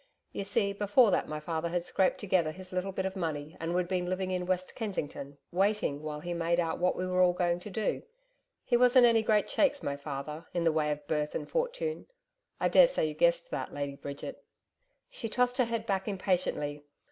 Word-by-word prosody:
You 200 - -4
see 200 0 +1
before 205 +3 +4
that - - +1
my 155 0 -3
father 160 +2 -2
had 175 0 -1
scraped 185 +1 +1
together 185 -5 +1
his 185 +3 -9
little 185 +2 -1
bit 190 0 -3
of 190 0 -3
money 155 -4 -3
and 165 +1 -2
we'd 180 -1 +1
been 180 -1 -1
living 185 0 -2
in 180 -1 -2
West 185 0 -1
Kensington 145 - -5
waiting 190 -6 +1
while 150 -1 -5
he 175 +1 -4
made 170 0 +1
out 165 -2 -1
what 180 +1 +2
we 185 - -2
were 185 0 +1
all 180 -1 +5
going 175 -1 0
to 195 - -9
do. 215 +2 -1 0.6
He - - +2
wasn't 250 +1 +6
any 230 -2 +5
great 215 -1 +2
shakes, 285 -1 +2
my 140 - -1
father, 145 +3 -6
in 175 - +1
the 165 - +4
way 155 -1 +1
of 150 0 -4
birth, 150 0 -1
and - - -3
fortune. - - -2 0.5
I - - +2
daresay, - - +5
you - - -5
guessed - - +2
that, - - -4
Lady 140 -1 -3
Bridget?' 140 0 -7 0.6
She 275 - -5
tossed 250 +2 +1
her 255 - +5
head 230 -1 -3
back 195 -2 -1
impatiently. 180 -7 -1
185 Hz, 210 wpm, -30 LUFS, 160-215 Hz, 0.6 s, wasn't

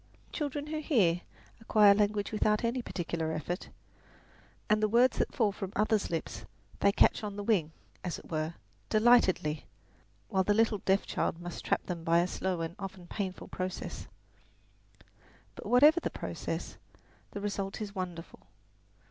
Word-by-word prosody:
Children 290 -1 -3
who 310 +1 -3
hear 200 - +2 0.4
acquire 210 -2 +6
language 205 0 0
without 210 0 +1
any 235 +2 0
particular 170 -6 -3
effort; 175 +4 -4 1.0
the 215 0 +3
words 240 +4 +3
that - - 0
fall 220 -4 +3
from 195 -1 -6
others' 215 0 +1
lips 165 -1 -4 0.4
they 200 - +4
catch 200 - +3
on 205 -1 -4
the 205 - -4
wing, 190 -8 +1 0.3
as 180 - -3
it - - -13
were, 155 +1 -2 0.3
delightedly, 215 -9 +3 0.6
while 190 -1 +1
the 205 +2 +2
little 225 -1 +3
deaf 190 +1 +1
child 165 - -1
must 175 0 -7
trap - - 0
them 175 -3 -5
by 165 0 +3
a 170 - +4
slow 185 -1 -2
and 165 +1 -4
often 190 -2 -7
painful 190 0 -5
process. 185 0 -5 1.5
But - - -9
whatever 295 +7 +6
the - - -2
process, - - -5 0.5
the 205 - -6
result 200 -1 -3
is 210 -2 -5
wonderful. 180 -4 -7
200 Hz, 150 wpm, -31 LUFS, 175-220 Hz, 1.5 s, acquire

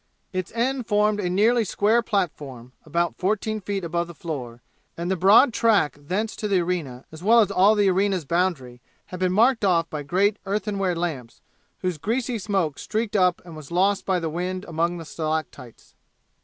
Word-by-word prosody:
Its 185 -1 -3
end 250 +1 -1
formed 210 0 +2
a 180 -3 -1
nearly 225 +6 +3
square 215 +4 +2
platform, 145 - -3 0.2
about 170 +3 0
fourteen 215 +3 -1
feet 200 -1 -3
above 170 0 -2
the 170 - -11
floor, 130 -8 -6 0.4
and 170 +2 -3
the - - +2
broad 205 - +5
track 220 -10 +2
thence 190 +10 -3
to 210 - -3
the 195 -3 +2
arena, 165 -8 -3
as 160 0 -11
well 225 +5 +5
as 215 - +3
all 200 +4 +4
the 205 -1 +3
arena's 190 -2 +1
boundary, 145 -7 -1 0.2
had 180 - -8
been 185 -1 +1
marked 225 +4 +3
off 170 -4 +2
by 150 - -4
great 195 +7 +1
earthenware 195 -2 -1
lamps, 155 -9 -4 0.4
whose 180 -4 -2
greasy 230 - -2
smoke 190 -7 -1
streaked 220 0 -3
up 180 -3 +2
and 170 -2 -10
was 155 -3 -10
lost 190 +3 +1
by 185 -2 0
the 165 - -3
wind 180 +4 -4
among 170 +1 -1
the 165 - -8
stalactites. 155 -6 -5
185 Hz, 185 wpm, -24 LUFS, 165-205 Hz, 0.4 s, broad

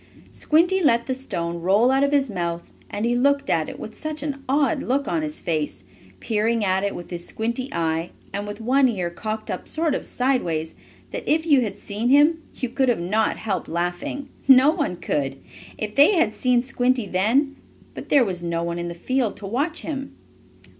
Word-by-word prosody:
Squinty 350 +5 +2
let 235 -7 +3
the 260 - -1
stone 170 -10 -4
roll 205 +8 +4
out 270 +1 +3
of 280 - +2
his 280 -2 +3
mouth, 170 -5 -3 0.3
and 210 +2 -2
he 240 +1 +1
looked 280 +2 +2
at 160 -2 +1
it - - -9
with 215 - -8
such 310 -1 -5
an 280 -2 -4
odd 275 -2 +2
look 275 +3 0
on 325 - 0
his 305 0 -3
face, 155 - -2 0.4
peering 220 0 0
at 190 0 +1
it 200 - -1
with 175 0 -9
his 175 0 -5
squinty 235 +4 -2
eye, 165 0 -1 0.2
and 205 +1 -3
with 205 - -6
one 260 +4 +3
ear 180 -6 -2
cocked 215 +4 -4
up - - -5
sort 320 -2 0
of - - -3
sideways, 175 -12 0 0.4
that, - - -5
if 320 +1 +2
you 285 -5 +5
had 220 -4 -2
seen 215 +4 -3
him, 300 +4 +5
you 255 - -2
could 245 -2 +1
not 195 +6 +1
have - - -3
helped 195 -6 -3
laughing. 175 - -3 0.2
No 265 +2 +8
one 295 - -1
could, 135 -5 -2 0.4
if 210 -1 -4
they 290 - +6
had 325 -11 +2
seen 250 0 +2
Squinty 255 -2 +1
then, 230 +10 +1 0.4
but - - -9
there 275 -4 +5
was 180 -4 -3
no 170 0 -1
one 170 0 -3
in 175 - -3
the 170 - -6
field 255 +4 -1
to 205 - -8
watch 280 - -2
him. 275 -3 -5
235 Hz, 200 wpm, -23 LUFS, 180-275 Hz, 0.4 s, No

